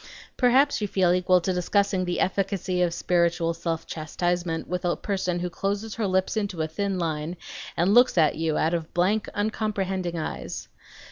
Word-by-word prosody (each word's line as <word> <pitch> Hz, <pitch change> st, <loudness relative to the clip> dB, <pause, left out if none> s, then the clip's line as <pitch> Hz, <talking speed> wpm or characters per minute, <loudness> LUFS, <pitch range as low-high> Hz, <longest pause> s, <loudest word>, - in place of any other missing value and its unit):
Perhaps 260 Hz, +1 st, +3 dB
you 210 Hz, -, 0 dB
feel 185 Hz, -3 st, +2 dB
equal 180 Hz, 0 st, +3 dB
to 185 Hz, +2 st, 0 dB
discussing 190 Hz, +1 st, +1 dB
the 175 Hz, -1 st, -2 dB
efficacy 190 Hz, -1 st, 0 dB
of 175 Hz, -1 st, +2 dB
spiritual 170 Hz, -1 st, +1 dB
self 165 Hz, -1 st, -3 dB
chastisement 170 Hz, +1 st, -2 dB
with 180 Hz, 0 st, -3 dB
a 175 Hz, -1 st, +1 dB
person 185 Hz, -3 st, -2 dB
who 180 Hz, -, -1 dB
closes 205 Hz, +4 st, -2 dB
her 220 Hz, -3 st, -1 dB
lips 190 Hz, +2 st, +1 dB
into 200 Hz, -6 st, -1 dB
a -, -, -1 dB
thin 195 Hz, +4 st, -2 dB
line 160 Hz, 0 st, -2 dB, 0.4 s
and 175 Hz, +4 st, +3 dB
looks 245 Hz, -3 st, +5 dB
at 155 Hz, -3 st, +5 dB
you 160 Hz, -1 st, -1 dB
out 160 Hz, +2 st, +1 dB
of 165 Hz, -2 st, -3 dB
blank, 200 Hz, +5 st, +1 dB
uncomprehending 195 Hz, -4 st, -1 dB
eyes! 155 Hz, -, -5 dB
180 Hz, 175 wpm, -26 LUFS, 170-200 Hz, 0.4 s, looks